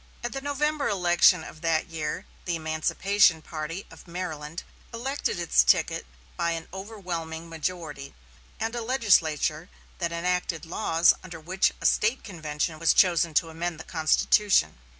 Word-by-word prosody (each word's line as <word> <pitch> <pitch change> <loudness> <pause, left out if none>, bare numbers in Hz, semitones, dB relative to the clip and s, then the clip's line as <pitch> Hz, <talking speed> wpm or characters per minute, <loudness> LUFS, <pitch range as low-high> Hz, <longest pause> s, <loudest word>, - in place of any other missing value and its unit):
At 240 - -3
the 270 - -4
November 290 +1 0
election 175 -3 +4
of 155 - -11
that 165 -1 +1
year 160 +2 -4 0.2
the 175 - -1
emancipation 160 +2 +2
party 165 +4 -5
of - - -14
Maryland 170 -2 -5 0.3
elected 255 -1 -2
its 170 -2 +4
ticket - - +2 0.3
by 170 0 0
an 165 -1 -6
overwhelming 175 -5 -6
majority, 160 -4 -5 0.4
and 225 +1 -2
a 240 - -3
legislature 175 - +2 0.3
that 170 -2 -1
enacted 175 0 -1
laws 165 -1 +3
under 170 -3 -9
which 185 +4 +1
a - - -7
State 225 +5 +2
convention 155 -4 -3
was 165 - +3
chosen 170 -3 +4
to 165 - +3
amend 165 0 -4
the - - -7
constitution. 160 - +2
170 Hz, 145 wpm, -26 LUFS, 160-195 Hz, 0.4 s, election